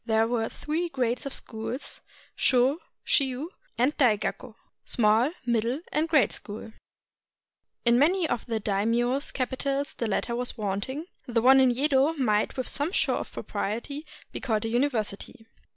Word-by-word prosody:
There 225 -1 +2
were 230 -1 0
three 330 +3 -3
grades 250 -3 -1
of 275 - -5
schools, 225 +4 -5 0.3
Sho, 260 +5 +3 0.3
Chiu, 275 +4 +1 0.3
and 255 +5 +2
Dai 245 -7 +4
Gakko - - -4 0.3
[Small, 225 +3 +3 0.2
Middle, 235 +4 0
and 315 +2 0
Great 305 -5 +4
School]. 220 +1 -8 1.1
In 235 +1 +5
many 340 +4 +3
of 240 - -2
the 225 -2 -1
daimios' 230 +7 +1
capitals 275 +2 -2
the 230 - -3
latter 235 +3 -1
was 245 0 -2
wanting; 215 - -3 0.2
the 235 -2 +1
one 265 +1 +8
in 260 -1 +6
Yedo 275 +4 +2
might 215 -5 +1
with 255 - -2
some 290 +4 -1
show - - +1
of - - -5
propriety 280 +9 -4 0.2
be - - -4
called 225 -4 -1
a - - -1
university. 225 -4 -1
245 Hz, 150 wpm, -27 LUFS, 225-280 Hz, 1.1 s, one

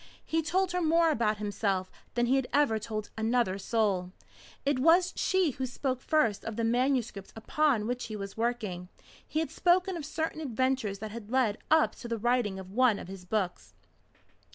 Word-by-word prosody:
He 325 0 0
told 370 +3 0
her 360 0 0
more 330 0 +4
about 215 -6 +1
himself 200 -2 -1 0.2
than 240 0 +2
he 255 +3 +3
had 265 -2 +1
ever 280 -7 +3
told 215 0 -5
another 220 -3 +1
soul. 195 -4 0 0.5
It 280 -2 +1
was 345 +6 +4
she 375 -5 +2
who 260 +1 -4
spoke 255 0 -3
first 235 -10 +1
of 225 - -5
the 230 - -2
manuscript 240 -4 0
upon 240 0 +1
which 245 +2 -2
he 215 - -6
was 195 -1 -6
working. 220 -6 -2 0.4
He 310 - -1
had 320 - -3
spoken 365 +1 +2
of 330 - -5
certain 315 +1 -3
adventures 260 -6 0
that 215 +1 -6
had 220 -1 -8
led 240 -4 +1
up 315 0 +4
to 240 - -8
the 230 -1 -2
writing 235 -3 +1
of 190 -1 -9
one 240 -1 +3
of 180 - -8
his 190 -2 -9
books. 180 - -3
240 Hz, 185 wpm, -29 LUFS, 210-290 Hz, 0.5 s, more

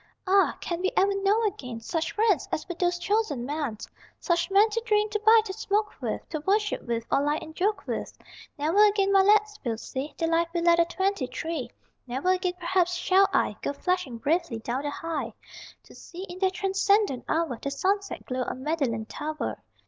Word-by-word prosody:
Ah, 390 +1 +3
can 345 0 -3
we 375 - +2
ever 395 +1 +4
know 415 +4 +3
again 250 - -4
Such 320 +8 -3
friends 425 -4 +2
as - - -3
were 355 - -3
those 350 0 0
chosen 350 - 0
men, 285 -5 -3 0.4
Such 340 -1 0
men 400 +3 +5
to 460 +2 -1
drink, 425 -2 +1
to 425 - 0
bike, 440 0 +6
to 380 - -4
smoke 420 0 -1
with, - - -3
To 310 - -3
worship 410 +6 0
with, 230 -1 -3
or - - +3
lie 295 +1 +1
and 315 - -10
joke 410 +5 -1
with? - - -4 0.4
Never 320 +8 +4
again, 395 -1 +2
my 390 - +7
lads, 420 +1 +3
we'll 230 -4 -2
see 265 +5 -6
The 330 - 0
life 330 +1 +2
we 340 - +1
led 340 0 +4
at 335 0 +3
twenty 380 -6 -1
three. 270 -1 -4 0.4
Never 265 +9 0
again, 365 -1 0
perhaps, 360 0 +1
shall 385 +2 +4
I - - +1
Go - - -2
flashing 360 -5 -2
bravely 315 +1 0
down 240 +4 -3
the 290 - -3
High 285 -7 -4 0.5
To - - -17
see, 355 +2 -10
in 360 -1 -8
that 380 -1 +2
transcendent 395 - +1
hour, 320 -8 0
The 280 - -2
sunset 395 +8 -1
glow 255 0 -3
on 255 +1 -4
Magdalen 270 -8 -1
Tower. 305 +6 -4
350 Hz, 200 wpm, -27 LUFS, 285-395 Hz, 0.5 s, my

